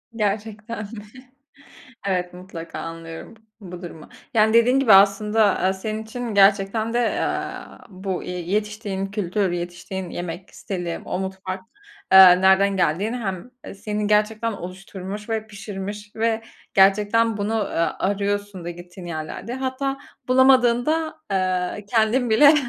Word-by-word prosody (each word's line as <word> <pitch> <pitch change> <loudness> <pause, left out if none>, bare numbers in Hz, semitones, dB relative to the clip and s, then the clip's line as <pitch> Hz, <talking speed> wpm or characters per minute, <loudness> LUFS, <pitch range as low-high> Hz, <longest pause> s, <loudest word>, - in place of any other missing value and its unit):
Gerçekten 215 +1 -3
mi? 210 0 -9 1.0
Evet, 180 -2 -1
mutlaka 180 -2 -8
anlıyorum 165 +4 -8
b 220 - -27 0.3
bu 180 0 -8
durumu. 165 -3 -9 0.3
Yani, 220 0 +4
dediğin 245 +3 +5
gibi 235 -7 +5
aslında, 205 +3 +5
aaa, 190 - +2
senin 215 +3 -4
için 230 0 -5
gerçekten 200 +3 +3
de, - - +2 0.3
aaa, - - -4
bu, 190 -1 -4
eee, 180 0 -5
yetiştiğin 205 +1 -2
kültür, 195 -1 -1
yetiştiğin 175 +1 -5
yemek 175 +2 -6
stili, 175 -4 -4
o - - -3
mutfak, 190 0 -5 0.5
eee, 185 -1 +9
nereden 190 +1 +4
geldiğini 190 +7 0
hem, 195 -1 -5
eee, - - -8
senin 210 +1 -3
gerçekten 215 +2 +1
oluşturmuş 190 +2 -8
ve 220 -1 -2
pişirmiş 205 0 -7
ve 225 0 0 0.3
gerçekten 210 +3 +4
bunu, 210 +2 -2
aaa, 185 -6 -1
arıyorsun 200 -1 -2
da 175 - -4
gittiğin 175 +1 -10
yerlerde. 170 +7 -5
Hatta 265 +1 -2 0.3
bulamadığında, 260 +5 +3
eee, 185 +1 -1
kendin 230 +2 +2
bile 285 +7 +7
200 Hz, 130 wpm, -23 LUFS, 185-220 Hz, 1.0 s, eee